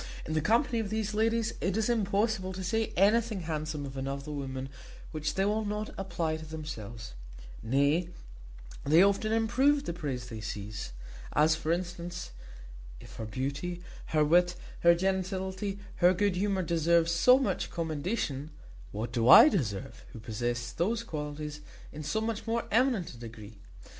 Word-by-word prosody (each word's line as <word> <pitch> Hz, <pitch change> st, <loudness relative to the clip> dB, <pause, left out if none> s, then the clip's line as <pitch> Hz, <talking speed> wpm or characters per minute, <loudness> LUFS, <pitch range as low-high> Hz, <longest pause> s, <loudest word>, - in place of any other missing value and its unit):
In 155 Hz, -, -3 dB
the 155 Hz, -, +1 dB
company 230 Hz, -, +2 dB
of 215 Hz, -3 st, -2 dB
these 215 Hz, 0 st, -2 dB
ladies 225 Hz, +1 st, +1 dB
it 190 Hz, +3 st, 0 dB
is 220 Hz, -, +1 dB
impossible 205 Hz, -3 st, 0 dB
to 185 Hz, 0 st, -5 dB
say 225 Hz, +4 st, 0 dB
anything 215 Hz, +1 st, +3 dB
handsome 155 Hz, -2 st, -3 dB
of 135 Hz, -1 st, -8 dB
another 135 Hz, +2 st, -4 dB
woman 135 Hz, -2 st, -4 dB, 0.4 s
which 155 Hz, -1 st, -2 dB
they 195 Hz, -, +2 dB
will 215 Hz, +2 st, +1 dB
not 210 Hz, +1 st, -3 dB
apply 170 Hz, -4 st, -2 dB
to 155 Hz, -, -9 dB
themselves; 120 Hz, -, -7 dB, 0.5 s
nay, 140 Hz, +8 st, +2 dB, 0.7 s
they 160 Hz, +6 st, +6 dB
often 200 Hz, +2 st, +2 dB
improve 255 Hz, +6 st, +3 dB
the 170 Hz, -, -3 dB
praise 140 Hz, -7 st, -4 dB
they 110 Hz, -2 st, -7 dB
seize; 105 Hz, -, -6 dB, 0.4 s
as, 155 Hz, +2 st, +4 dB
for 160 Hz, 0 st, -2 dB
instance, 175 Hz, 0 st, -4 dB, 0.7 s
if -, -, -12 dB
her 110 Hz, -, -4 dB
beauty, 140 Hz, -, -4 dB, 0.2 s
her 155 Hz, -1 st, +2 dB
wit, 175 Hz, +3 st, +4 dB, 0.2 s
her 170 Hz, 0 st, +6 dB
gentility, 190 Hz, +2 st, -2 dB, 0.2 s
her 180 Hz, +1 st, +5 dB
good 200 Hz, 0 st, +1 dB
humour 195 Hz, 0 st, 0 dB
deserve 170 Hz, 0 st, +3 dB
so 170 Hz, +10 st, +6 dB
much 270 Hz, -, -1 dB
commendation, 155 Hz, -, -2 dB, 0.4 s
what 110 Hz, +3 st, -4 dB
do 115 Hz, +1 st, +2 dB
I 300 Hz, -, +11 dB
deserve, 115 Hz, -, -3 dB
who 115 Hz, -, -8 dB
possess 120 Hz, +2 st, -3 dB
those 225 Hz, +7 st, -1 dB
qualities 150 Hz, -4 st, -5 dB, 0.3 s
in 150 Hz, -, -7 dB
so 220 Hz, +9 st, -1 dB
much 225 Hz, 0 st, -3 dB
more 230 Hz, +1 st, 0 dB
eminent 235 Hz, -5 st, +2 dB
a -, -, -12 dB
degree? 110 Hz, -3 st, -10 dB
170 Hz, 160 wpm, -30 LUFS, 140-205 Hz, 0.7 s, I